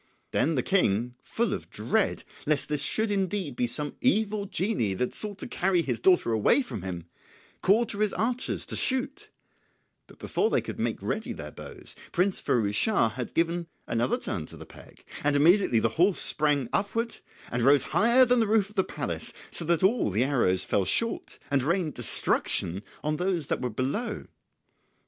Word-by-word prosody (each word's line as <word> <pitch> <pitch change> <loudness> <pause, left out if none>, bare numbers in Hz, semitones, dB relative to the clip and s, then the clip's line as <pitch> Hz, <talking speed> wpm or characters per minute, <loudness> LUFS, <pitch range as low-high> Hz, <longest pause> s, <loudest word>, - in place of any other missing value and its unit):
Then 160 +2 +1
the 125 - 0
King, 120 - +1
full 235 +1 -1
of - - -6
dread - - 0 0.2
lest 150 -1 0
this 150 -2 0
should 220 -1 0
indeed 190 -7 -1
be 120 - 0
some 145 +5 -1
evil 215 -5 +1
genie 185 - -1
that 125 +6 -2
sought 210 -2 -3
to - - -7
carry 180 -2 +1
his 125 -6 -2
daughter 180 -4 +3
away 110 - +3
from 115 - -6
him, 90 -2 -6 0.6
called 220 +5 +3
to 200 - -3
his 210 -1 +2
archers 240 +5 -2
to - - -5
shoot, 275 +10 -1 0.8
but - - -17
before 435 - 0
they - - +2
could - - -7
make - - -1
ready - - -3
their - - -8
bows - - -9 0.2
Prince 185 +2 +1
Firouz 105 -4 +1
Schah 205 - +2
had 125 +1 -6
given 170 0 0 0.2
another 120 +2 0
turn 80 -5 -4
to - - -11
the - - -10
peg, - - -16 0.2
and 145 0 +2
immediately 165 - +4
the 115 +1 +2
horse 185 +2 +4
sprang 145 -4 +3
upward 225 +3 -1 0.3
and 120 - -1
rose 140 +3 +5
higher 235 +4 +5
than 250 0 +3
the 225 - +2
roof 210 -1 +2
of - - -18
the 190 - +4
palace, - - -4 0.2
so - - -2
that 170 +2 +1
all 210 - +3
the 105 +5 +1
arrows 120 -9 +2
fell 100 - +1
short 230 - -1
and 140 -1 +3
rained 165 +2 0
destruction 90 +4 +1 0.2
on 150 0 -1
those 180 -3 -1
that - - -2
were 125 - -1
below. 135 - -3
170 Hz, 185 wpm, -27 LUFS, 125-210 Hz, 0.8 s, rose